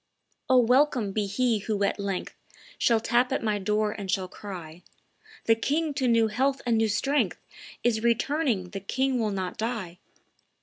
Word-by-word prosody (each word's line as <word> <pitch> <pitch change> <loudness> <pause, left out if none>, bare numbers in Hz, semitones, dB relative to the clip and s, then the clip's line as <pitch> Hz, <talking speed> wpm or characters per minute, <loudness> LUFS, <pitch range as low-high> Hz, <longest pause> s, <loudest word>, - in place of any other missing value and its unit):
"O, 260 - +6
welcome 250 -3 +3
be 205 0 -1
he 230 +2 +1
who 205 0 -2
at 200 - 0
length 200 -2 -3 0.5
Shall 230 -2 +3
tap 240 +3 +1
at 265 - -1
my 210 -2 0
door 210 +2 0
and 200 -2 -7
shall 185 0 0
cry, 180 -4 -9 0.6
'The 225 - +5
king 300 +5 0
to 265 -2 0
new 230 -2 +4
health 265 +5 0
and 235 -2 +2
new 225 0 +2
strength 280 +7 0 0.4
Is 230 -2 +1
returning; 235 - +1
the 195 - -4
king 260 +6 -1
will 220 -2 0
not 190 -2 -4
die! 215 -7 -3
225 Hz, 170 wpm, -27 LUFS, 200-250 Hz, 0.6 s, O